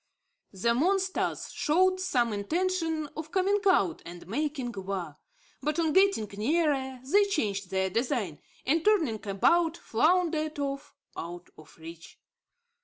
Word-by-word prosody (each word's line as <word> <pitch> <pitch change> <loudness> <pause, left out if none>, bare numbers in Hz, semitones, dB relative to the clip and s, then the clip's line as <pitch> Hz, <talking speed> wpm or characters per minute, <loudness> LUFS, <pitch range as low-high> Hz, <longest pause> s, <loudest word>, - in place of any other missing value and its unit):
The 220 +5 +1
monsters 375 +8 0
showed 370 +3 +2
some 245 -11 +1
intention 325 - -1
of 315 0 -6
coming 395 +2 +2
out 190 - +2
and 175 0 -10
making 270 - -2
war; 190 -5 -4 0.5
but, 300 +1 -1
on 320 -3 +1
getting 385 - +4
nearer, 270 -1 0
they 405 +9 +4
changed 205 - -2
their 190 0 0
design, 230 - -1 0.3
and, 315 +5 +2
turning 325 - +2
about, 330 - +2
floundered 310 +3 +1
off 275 -1 -4 0.2
out 175 +1 -7
of 155 -1 -17
reach. 165 +1 -11
285 Hz, 125 wpm, -28 LUFS, -, 0.5 s, getting